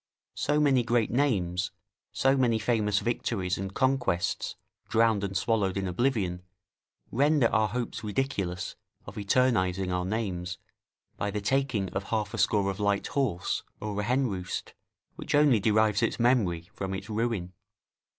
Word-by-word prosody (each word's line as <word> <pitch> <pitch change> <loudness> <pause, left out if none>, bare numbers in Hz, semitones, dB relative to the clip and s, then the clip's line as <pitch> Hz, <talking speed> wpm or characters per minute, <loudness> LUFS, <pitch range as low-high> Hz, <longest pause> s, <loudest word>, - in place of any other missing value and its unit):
So 150 0 +1
many 140 -4 +4
great 120 -1 +1
names, 95 -9 +1 0.4
so 135 +1 +3
many 120 -4 +3
famous 105 -2 +1
victories 100 -6 -1
and 95 0 -4
conquests 130 -7 0 0.3
drowned 110 -2 +3
and 95 -1 -1
swallowed 100 -4 +1
in 95 - -1
oblivion, 95 -3 0 0.7
render 145 +2 +3
our 110 0 +3
hopes 120 +3 -4
ridiculous 100 -6 -2 0.3
of 100 - -9
eternising 100 -4 +1
our 90 0 0
names 90 -4 -3 0.6
by 100 - -1
the 105 +1 -2
taking 120 -3 0
of 95 0 -3
half 105 -1 -2
a 115 - -3
score 100 -2 +2
of 95 - -8
light 100 -1 +1
horse, 120 -11 -1 0.2
or 105 -1 -3
a - - -3
henroost, 115 -7 -1 0.4
which - - -2
only 145 -6 +5
derives 110 0 +3
its 115 - 0
memory 100 -8 +2
from 95 -2 -4
its 95 +2 -6
ruin. 110 -5 -2
105 Hz, 145 wpm, -28 LUFS, 95-120 Hz, 0.7 s, only